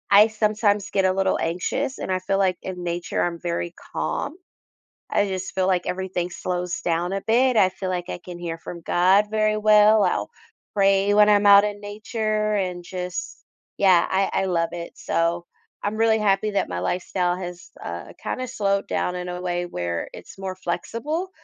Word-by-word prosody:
I 205 +2 +8
sometimes 215 -2 +1
get 195 -1 +1
a 185 - +3
little 190 0 +1
anxious 175 +10 -2
and - - -3
I 185 - +1
feel 195 +1 -1
like 190 -2 +2
in 180 -1 -5
nature 175 0 -2
I'm 170 -1 -1
very 170 0 -3 0.2
calm. - - -2 0.8
I 205 - +2
just 190 0 -4
feel 190 -1 +1
like 185 -2 +1
everything 180 -1 -2
slows 180 -1 -3
down 175 +2 -1
a 195 - -1
bit, 245 +2 +3
I 190 -3 +6
feel 185 0 -5
like 180 -1 -3
I - - -4
can 175 -1 -8
hear 170 -1 -5
from 170 +1 -8
God 185 +5 +3
very 215 0 +2
well, 215 0 +6
I'll - - 0 0.4
pray 195 0 +3
when 210 0 +6
I'm 205 -1 +4
out 200 0 +8
in 205 -1 -3
nature 215 +1 -2
and 180 -3 -2
just, 180 0 -5 0.4
yeah, 185 -3 +5
I 195 +1 +1
I - - +1
love 170 -2 0
it. 170 -1 -6
So, 170 +1 0 0.4
I'm 205 +1 -1
really 225 0 +3
happy 210 0 +2
that 200 - 0
my 90 - -3
lifestyle 180 - -1
has, 180 -1 -8
uh, 85 0 -6
kinda 255 - -3
slowed 200 -4 0
down 180 - -1
in 180 0 -5
a 180 0 -4
way 175 -1 -1
where 85 - -3
it's - - -12
more 190 -1 -4
flexible. 270 - -3
190 Hz, 190 wpm, -23 LUFS, 175-210 Hz, 0.8 s, I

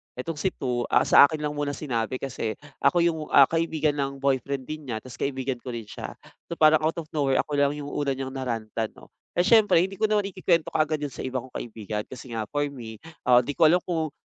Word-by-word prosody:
Etong 150 +5 -5
si 190 - 0
2, 125 -2 -2
ah, - - +6
sa - - +8
akin 155 +1 -3
lang 150 - -1
muna 145 -1 -1
sinabi 125 -5 -2
kasi 115 -5 -3 0.3
ako 170 +5 +3
yung, 170 -2 +1
ah, 140 - +9
kaibigan 160 -2 0
ng 140 -1 -3
boyfriend 140 0 0
din 155 -1 -6
niya 110 -3 -3
ta's 130 -1 -11
kaibigan 135 -2 -2
ko 125 - -7
rin 115 -1 -5
siya. - - -7 0.3
So, - - -5
parang 155 -1 +5
out 160 - +1
of 155 - -14
nowhere 140 -3 +1
ako 145 - -4
lang 140 0 +3
yung 145 -1 -6
una 145 -1 -1
niyang 135 0 -4
na-rant-an, 115 -4 -3
'no? - - -16 0.3
Eh, 175 - +4
siyempre 215 -4 +5
hindi 195 +1 -4
ko - - -3
naman 210 -2 +1
ikikwento 170 -4 +1
kaagad 155 -1 +1
yun 145 -1 -4
sa - - -7
iba 130 0 -2
kong 130 - -15
kaibigan 105 -2 -5
kasi 130 -1 -10
nga 110 - -1
for 145 0 0
me, 115 -6 -9 0.3
ah, 125 -1 +7
'di 145 - -3
ko 170 - +3
alam 175 +3 +5
kung 160 -4 -1
140 Hz, 235 wpm, -26 LUFS, 125-155 Hz, 0.3 s, ah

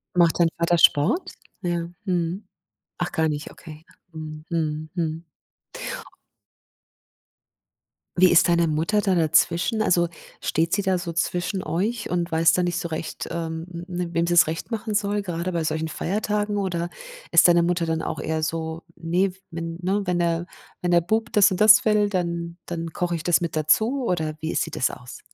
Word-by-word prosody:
Macht 170 -1 +3
dein 170 -1 +5
Vater 170 +1 +2
Sport? 170 - +3 0.3
Ja, 170 -2 -2 0.2
mhm. 180 +2 -2 0.5
Ach, 175 0 -2
gar 160 -1 +1
nicht, 150 0 -4
okay. 155 -2 -12 0.3
Mhm, 155 -1 -8
mhm, 155 -2 -2
mhm. 165 -1 -2 3.0
Wie 185 -1 +6
ist 175 0 +5
deine 170 0 +3
Mutter 160 +7 +1
da 195 -2 +1
dazwischen? 170 +6 +2
Also, 175 -4 +3 0.3
steht 165 +3 0
sie 200 - +2
da 190 -1 +1
so 175 -1 -5
zwischen 180 +3 -1
euch 210 +8 -2
und 175 -1 -1
weiß 160 +1 +4
da 180 - +2
nicht 175 -1 -1
so 170 - -3
recht, 160 0 -5
ähm, 165 0 -4
hm, 170 +1 -7
hm, 170 -1 -3
wem 170 - +2
sie's 175 -1 +5
recht 165 +9 -5
machen 220 -1 -3
soll, 205 0 0
gerade 180 -1 -3
bei 170 -2 -1
solchen 155 +1 -1
Feiertagen? 210 +4 -1
Oder 175 -3 -2 0.4
ist - - +7
deine 175 0 +5
Mutter 170 0 +1
dann 160 0 -1
auch - - -4
eher 160 0 -2
so: 160 +1 -3
„Ne, 175 +3 0 0.2
wenn 165 0 -5
ne, 195 +3 +1
wenn, 180 -1 0
ne 170 0 0 0.3
wenn 180 - -1
der 170 0 +5
Bub 220 +6 -1
das 205 -4 +5
und 185 - -2
das 215 0 +8
will, 210 -1 +3
dann 170 -2 -3
dann 165 -1 -5
koche 175 +1 -2
ich 160 - -4
das 175 -2 +3
mit 170 -2 -3
dazu.“ 220 - +2
oder 160 -3 -1
wie 160 - -3
sieht - - -1
das - - +1
aus? 125 -1 -10
170 Hz, 180 wpm, -24 LUFS, 165-185 Hz, 3.0 s, das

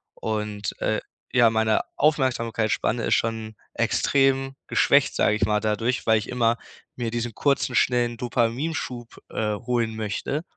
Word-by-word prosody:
Und, 105 -1 -3
äh, - - +1 0.3
ja, 120 -3 +6
meine 110 -1 +2 0.2
Aufmerksamkeitsspanne 120 -5 +1
ist - - +2
schon 110 -1 -2 0.2
extrem 135 -1 +1
geschwächt, - - +3
sage 105 - +3
ich 105 - +1
mal, 105 0 +1
dadurch, 110 +3 -1
weil 110 0 +5
ich 105 - -7
immer 120 -1 +2 0.4
mir 120 -2 -2
diesen 120 -1 -3
kurzen, 140 -1 0
schnellen 120 -1 +2
Dopaminschub, 120 +1 -2
äh, 105 -1 -1
holen 115 -1 -1
möchte. 110 +8 -3
115 Hz, 135 wpm, -24 LUFS, 110-125 Hz, 0.4 s, ja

